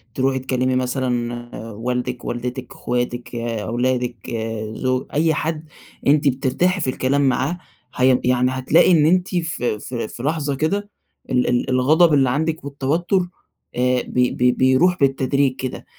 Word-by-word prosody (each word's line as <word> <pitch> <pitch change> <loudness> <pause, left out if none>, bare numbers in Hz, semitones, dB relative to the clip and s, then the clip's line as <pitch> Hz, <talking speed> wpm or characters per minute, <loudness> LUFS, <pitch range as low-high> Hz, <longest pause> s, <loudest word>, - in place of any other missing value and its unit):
تروحي 130 0 +1
تكلمي 130 0 0
مثلًا 120 -3 -3
والدِك، 125 +2 -3
والدتِك، 125 +1 -4
أخواتِك، 120 0 -3
أولادِك، 120 +2 -2 0.4
زو 130 +2 -1
أي 160 +2 +2
حد 155 +1 -3 0.4
أنتِ 145 +1 +4
بترتاحي 140 +8 +1
في 135 - 0
الكلام 130 +2 0
معاه، 135 +7 -1 0.4
هي 130 0 +4
يعني 125 0 +2
هتلاقي 130 +7 +3
إن 155 -4 +5
أنتِ 180 +3 +3
في 155 -10 -1
في 120 0 -4
في 120 - -9
لحظة 145 -1 -1
كده 200 +8 -1 0.4
ال 125 -1 +1
ال 125 0 0
الغضب 150 +6 +4
اللي 135 -3 +4
عندِك 155 +4 -1
والتوتر، 150 +7 0 0.5
آآ، 125 0 +2
بي 125 0 0
بي 125 0 +2
بيروح 130 +9 +3
بالتدريج 135 -1 +2
كده. 130 -1 -6
130 Hz, 140 wpm, -21 LUFS, 125-150 Hz, 0.5 s, إن